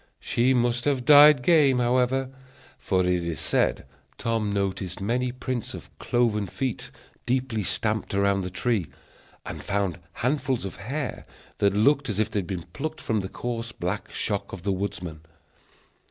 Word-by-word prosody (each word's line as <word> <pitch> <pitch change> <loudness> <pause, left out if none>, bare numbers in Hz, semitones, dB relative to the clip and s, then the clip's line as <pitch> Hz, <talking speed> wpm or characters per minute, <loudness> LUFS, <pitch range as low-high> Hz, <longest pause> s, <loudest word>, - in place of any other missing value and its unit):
She 130 +3 +2
must 120 0 +1
have 135 -4 +1
died 145 -1 +8
game, 145 -4 +5
however; 125 +2 +1 0.5
for 95 -2 +1
it 90 -1 +1
is 85 -3 -3
said - - +1 0.3
Tom 115 -3 -1
noticed 95 -2 -2
many 120 +5 0
prints 125 -2 -4
of - - -12
cloven 110 -4 +1
feet 130 +6 -3 0.4
deeply 125 -3 0
stamped 105 +3 0
about 100 0 +2
the 90 - -3
tree, 100 -1 0 0.6
and - - -6
found 100 -4 -1
handfuls 130 -2 -1
of 95 - -6
hair, 130 +8 -4 0.4
that 100 -1 +3
looked 135 +5 +3
as 105 - -2
if 110 - 0
they 105 - 0
had 90 - -5
been 90 -2 -4
plucked 155 +2 -4
from 110 -2 -1
the 95 -1 -4
coarse 115 -1 -4
black 95 +1 -4
shock 100 -2 -3
of 90 - -8
the 100 - 0
woodsman. 95 -5 -4
115 Hz, 160 wpm, -26 LUFS, 100-125 Hz, 0.6 s, died